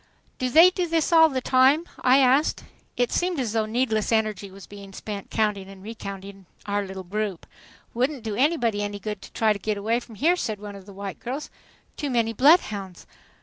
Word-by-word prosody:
"Do 255 Hz, -, 0 dB
they 330 Hz, +7 st, +7 dB
do 360 Hz, -1 st, -2 dB
this 325 Hz, -1 st, 0 dB
all 320 Hz, -1 st, +7 dB
the 260 Hz, -3 st, -2 dB
time?" 265 Hz, +6 st, +4 dB
I 255 Hz, +1 st, +4 dB
asked. 270 Hz, +3 st, +3 dB, 0.3 s
It 245 Hz, -1 st, +1 dB
seemed 355 Hz, -3 st, 0 dB
as 235 Hz, -5 st, -2 dB
though 220 Hz, -1 st, 0 dB
needless 225 Hz, -2 st, 0 dB
energy 215 Hz, -3 st, 0 dB
was 195 Hz, +1 st, -12 dB
being 200 Hz, -1 st, -12 dB
spent 200 Hz, 0 st, -7 dB
counting 210 Hz, -3 st, -1 dB
and 195 Hz, -1 st, -13 dB
recounting 195 Hz, -3 st, -8 dB, 0.2 s
our 205 Hz, 0 st, -1 dB
little 190 Hz, -1 st, -7 dB
group. 200 Hz, -1 st, -4 dB, 0.5 s
"Wouldn't 255 Hz, +1 st, -1 dB
do 220 Hz, -2 st, -3 dB
anybody 240 Hz, -4 st, +1 dB
any 205 Hz, 0 st, -3 dB
good 210 Hz, 0 st, -6 dB
to -, -, -12 dB
try 220 Hz, -1 st, +2 dB
to 200 Hz, -, -8 dB
get 210 Hz, +1 st, -2 dB
away 225 Hz, +4 st, 0 dB
from 235 Hz, -2 st, -13 dB
here," 325 Hz, -, +3 dB
said 220 Hz, -, -3 dB
one 205 Hz, -1 st, -8 dB
of 195 Hz, 0 st, -13 dB
the -, -, -10 dB
white 195 Hz, -2 st, -7 dB
girls. 265 Hz, +5 st, -5 dB, 0.5 s
"Too 290 Hz, -, -3 dB
many 230 Hz, -3 st, 0 dB
bloodhounds!" 210 Hz, -, +2 dB
220 Hz, 200 wpm, -24 LUFS, 200-260 Hz, 0.5 s, they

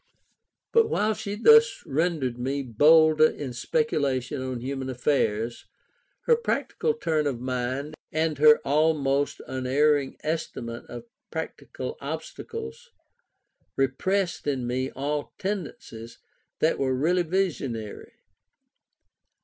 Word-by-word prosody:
But 460 Hz, -1 st, +4 dB
while 215 Hz, +1 st, +1 dB
she 205 Hz, -1 st, -5 dB
thus 455 Hz, -, +5 dB
rendered 140 Hz, -5 st, -1 dB
me 135 Hz, +3 st, -2 dB
bolder 155 Hz, +5 st, +5 dB
in 135 Hz, -4 st, -6 dB
speculation 135 Hz, -, -1 dB
on 130 Hz, -1 st, -4 dB
human 130 Hz, +1 st, -4 dB
affairs, 120 Hz, -3 st, -1 dB, 0.5 s
her 475 Hz, -, +4 dB
practical 465 Hz, 0 st, -1 dB
turn 155 Hz, -3 st, 0 dB
of 130 Hz, -4 st, -2 dB
mind, 130 Hz, +3 st, -3 dB, 0.2 s
and 155 Hz, -2 st, 0 dB
her 150 Hz, 0 st, +8 dB
almost 145 Hz, -1 st, +1 dB
unerring 135 Hz, +2 st, +1 dB
estimate 125 Hz, -7 st, -4 dB
of 120 Hz, -1 st, -8 dB, 0.3 s
practical -, -, -6 dB
obstacles, 65 Hz, -, -7 dB, 0.9 s
repressed 170 Hz, +7 st, 0 dB
in 135 Hz, -4 st, -1 dB
me 130 Hz, +2 st, -1 dB
all 145 Hz, +2 st, -4 dB
tendencies 150 Hz, -, -5 dB, 0.4 s
that 160 Hz, -, +2 dB
were 130 Hz, -1 st, +1 dB
really 170 Hz, +7 st, +2 dB
visionary. 155 Hz, -, -3 dB
145 Hz, 105 wpm, -26 LUFS, 130-165 Hz, 0.9 s, her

